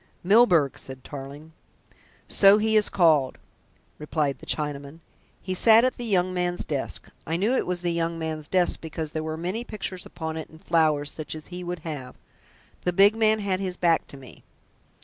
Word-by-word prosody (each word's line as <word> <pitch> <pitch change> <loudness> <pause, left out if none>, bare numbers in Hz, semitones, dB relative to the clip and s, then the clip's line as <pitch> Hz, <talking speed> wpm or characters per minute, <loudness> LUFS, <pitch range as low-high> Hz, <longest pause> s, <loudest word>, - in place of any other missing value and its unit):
"Milburgh!" 180 - +4
said 130 -1 -9
Tarling. 145 +3 -9 0.8
"So 200 +1 +6
he 220 +1 +1
is 210 -1 +4
called," 155 -7 +3 0.6
replied 150 -3 -1
the - - -14
Chinaman. 145 +1 -3 0.4
"He 185 - -3
sat 225 +4 +6
at 255 - -1
the 240 - -5
young 185 -4 +1
man's 180 -1 -1
desk. 140 -3 -4 0.2
I 165 +2 -1
knew 210 +7 +1
it - - 0
was 180 -1 -2
the 175 -1 0
young 165 0 -1
man's 160 -2 -4
desk, 180 +1 +1
because 160 -1 -5
there 155 - -3
were 155 0 -4
many 185 +8 -3
pictures 195 -5 -5
upon 160 -1 -6
it 160 - -7
and 160 - -16
flowers, 155 -4 +1
such 155 -1 -6
as 155 - -9
he 180 0 -6
would 175 0 -4
have. 145 -6 -6 0.7
The 180 - 0
big 200 +4 +5
man 220 -1 +2
had 190 -2 -1
his 185 -2 -4
back 165 -3 +2
to 140 - -12
me." 130 -3 -14
170 Hz, 190 wpm, -25 LUFS, 155-185 Hz, 0.8 s, So